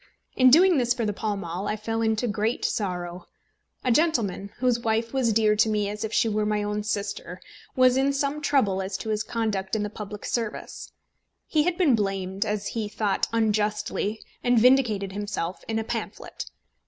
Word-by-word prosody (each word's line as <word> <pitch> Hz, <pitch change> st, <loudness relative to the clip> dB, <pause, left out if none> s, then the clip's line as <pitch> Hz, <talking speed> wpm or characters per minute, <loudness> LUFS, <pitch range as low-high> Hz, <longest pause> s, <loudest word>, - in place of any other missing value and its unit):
In 255 Hz, -1 st, +6 dB
doing 340 Hz, +3 st, +6 dB
this 245 Hz, 0 st, +1 dB
for 235 Hz, -3 st, -1 dB
the 210 Hz, -, -1 dB
Pall 210 Hz, 0 st, -2 dB
Mall, 180 Hz, +1 st, -4 dB
I -, -, 0 dB
fell 225 Hz, +1 st, -3 dB
into 220 Hz, +1 st, +1 dB
great 215 Hz, +3 st, -1 dB
sorrow. 180 Hz, -3 st, -3 dB, 0.6 s
A 255 Hz, -, +2 dB
gentleman, 230 Hz, -, +1 dB
whose 245 Hz, -1 st, +2 dB
wife 225 Hz, +1 st, -1 dB
was 255 Hz, -4 st, +2 dB
dear 215 Hz, -1 st, +3 dB
to 220 Hz, +1 st, +3 dB
me 210 Hz, -1 st, 0 dB
as 210 Hz, +1 st, -5 dB
if 220 Hz, -, -3 dB
she 230 Hz, -, +2 dB
were 215 Hz, -1 st, 0 dB
my 210 Hz, 0 st, 0 dB
own 210 Hz, 0 st, -2 dB
sister, 200 Hz, -3 st, -4 dB, 0.4 s
was 255 Hz, 0 st, +5 dB
in 270 Hz, +1 st, +3 dB
some 280 Hz, +2 st, -1 dB
trouble 215 Hz, -10 st, +2 dB
as 190 Hz, 0 st, -3 dB
to 220 Hz, -, -6 dB
his 215 Hz, -1 st, 0 dB
conduct 220 Hz, -4 st, -2 dB
in 215 Hz, -, 0 dB
the 210 Hz, -, -4 dB
public 210 Hz, -1 st, -7 dB
service. 230 Hz, -3 st, -4 dB, 0.5 s
He 305 Hz, -1 st, +1 dB
had 355 Hz, -1 st, 0 dB
been 330 Hz, -8 st, +4 dB
blamed, 195 Hz, -2 st, -1 dB
as 210 Hz, -1 st, -2 dB
he 220 Hz, -3 st, -3 dB
thought 205 Hz, -2 st, 0 dB
unjustly, 215 Hz, -1 st, 0 dB, 0.2 s
and 245 Hz, -1 st, +3 dB
vindicated 225 Hz, -5 st, +4 dB
himself 200 Hz, -3 st, -4 dB
in 225 Hz, -, -1 dB
a 225 Hz, -, -1 dB
pamphlet. 225 Hz, -1 st, -5 dB
215 Hz, 190 wpm, -26 LUFS, 205-240 Hz, 0.6 s, In